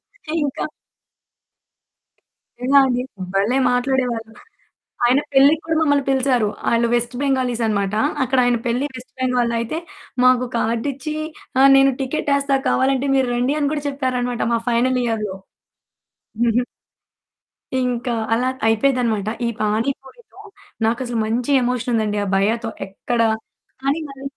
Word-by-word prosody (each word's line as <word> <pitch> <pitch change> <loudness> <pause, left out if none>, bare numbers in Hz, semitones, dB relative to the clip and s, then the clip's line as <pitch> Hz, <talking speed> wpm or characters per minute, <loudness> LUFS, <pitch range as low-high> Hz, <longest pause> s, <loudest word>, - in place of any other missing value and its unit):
అయితే 310 - -9
ఇంకా 280 - -2 2.0
నిజంగా 275 +3 +5
అండి. 250 -1 0 0.3
భలే 210 +7 +2
మాట్లాడేవాళ్ళు. 245 -3 -1 0.7
ఆయన 250 +3 +4
పెళ్ళికి 280 +4 +5
కూడా 320 0 0
మమ్మల్ని 285 -3 +2
పిలిసారు. 260 -4 +2 0.2
ఆయన 235 0 +2
వెస్ట్ 240 +1 -1
బెంగాలీస్ 255 -4 0
అన్నమాట. 200 -2 0 0.3
అక్కడ 260 +1 0
ఆయన 245 -1 +3
పెళ్లి 245 +3 0
వెస్ట్ 255 0 -11
బెంగాల్‌లో 250 -2 +1
అయితే 235 +8 -3 0.5
మాకు 255 0 +5
కార్డిచ్చి, 260 +6 -2 0.5
ఆహ్, 275 +1 +7
నేను 270 0 +5
టికెటేస్తా 280 0 0
కావాలంటే 270 +1 +1
మీరు 265 -2 +2
రండీ 250 +4 +1
అని 285 -1 +1
కూడా 295 -1 -3
చెప్పారన్నమాట 255 -3 -1
మా 230 - +2
ఫైనల్ 250 +2 +2
ఇయర్‌లో. 215 -4 -2 1.1
హుహు. 240 +1 +2 1.2
ఇంకా 245 -1 -1 0.2
అలా 245 +3 +2 0.2
అయిపోయేదనమాట. 225 -2 +1 0.2
ఈ - - +1
పాని 215 +4 +1
పూరి‌తో 405 - -17 0.5
నాకసలు 240 +1 -1
మంచి 235 +4 -1
ఎమోషన్ 245 0 -1
ఉందండి, 215 -2 0
ఆ - - -5
భయ్యా‌తో 225 +4 0 0.2
ఎక్కడ 230 +5 -3 0.6
కాని 280 +4 0
మరి 275 -1 -11
250 Hz, 125 wpm, -20 LUFS, 230-270 Hz, 2.0 s, ఆహ్